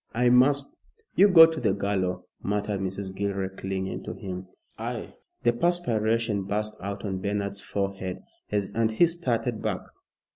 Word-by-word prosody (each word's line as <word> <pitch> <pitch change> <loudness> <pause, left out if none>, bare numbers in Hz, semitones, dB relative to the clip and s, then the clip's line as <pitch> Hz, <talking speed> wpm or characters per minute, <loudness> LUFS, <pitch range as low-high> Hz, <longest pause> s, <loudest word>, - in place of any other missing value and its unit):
I 125 +1 +4
must 135 +3 +3 0.2
" 450 0 -39
"You 200 - +7
go 170 -5 +10
to 160 -1 -2
the 105 -5 +2
gallow," 100 -2 -1 0.2
muttered 105 0 -1
Mrs. 95 0 -4
Gilroy 100 -1 -1
clinging 95 0 -4
to - - -5
him. 95 -1 -6 0.3
"I!" - - -5 0.3
the 120 - +4
perspiration 115 - +1
burst 105 +2 -2
out 100 +2 -5
on 95 -2 -3
Bernard's 100 0 -2
forehead, 95 -2 -3 0.3
and 105 +2 +1
he 140 - +6
started 125 -9 -1
back. - - -1
105 Hz, 150 wpm, -27 LUFS, 95-120 Hz, 0.3 s, go